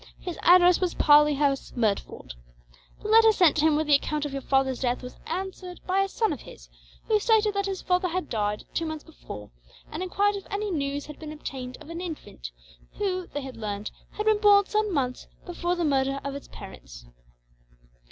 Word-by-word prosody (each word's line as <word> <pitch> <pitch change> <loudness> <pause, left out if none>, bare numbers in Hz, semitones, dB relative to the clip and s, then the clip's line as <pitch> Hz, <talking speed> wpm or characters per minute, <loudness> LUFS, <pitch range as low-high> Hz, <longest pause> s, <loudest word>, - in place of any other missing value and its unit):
His 355 -2 -7
address 355 0 +6
was 365 -2 0
Parley 295 0 +6
House, 275 -1 0
Merdford. 210 - -2 0.7
The - - -4
letter 445 +1 +7
sent 355 -7 +4
to 310 - +3
him 315 -2 +4
with 310 +1 +1
the 295 - +3
account 295 +1 +1
of 290 - -5
your 275 - -3
father's 265 -1 +1
death 250 -1 -1
was 250 - -8
answered 365 +1 -5
by 375 +1 +1
a 390 - +1
son 440 -2 0
of 280 - -8
his; - - -13 0.4
who 430 -1 +2
stated 430 -1 +3
that 400 0 -1
his 385 -1 -4
father 360 0 +1
had 365 +1 -3
died, 210 -2 -2
two 330 - -1
months 315 -1 -5
before, 105 - -10 0.4
and 310 - -5
enquired 400 +2 +1
if 395 - -10
any 410 0 -2
news 285 -3 -2
had 300 - -11
been 310 -1 -7
obtained 260 -4 -7
of 320 - -11
an 335 +1 -5
infant 180 - -7 0.4
who, 370 -3 -2
they 290 - -5
had 265 -3 -8
learned, 210 -1 -4 0.2
had 425 - -3
been 435 -1 +3
born 405 -1 +6
some 425 0 0
months 255 -6 -2 0.2
before 350 0 -2
the 345 -1 -1
murder 275 -1 +1
of 280 - -4
its 280 - -8
parents. - - -11
315 Hz, 200 wpm, -26 LUFS, 270-380 Hz, 0.7 s, letter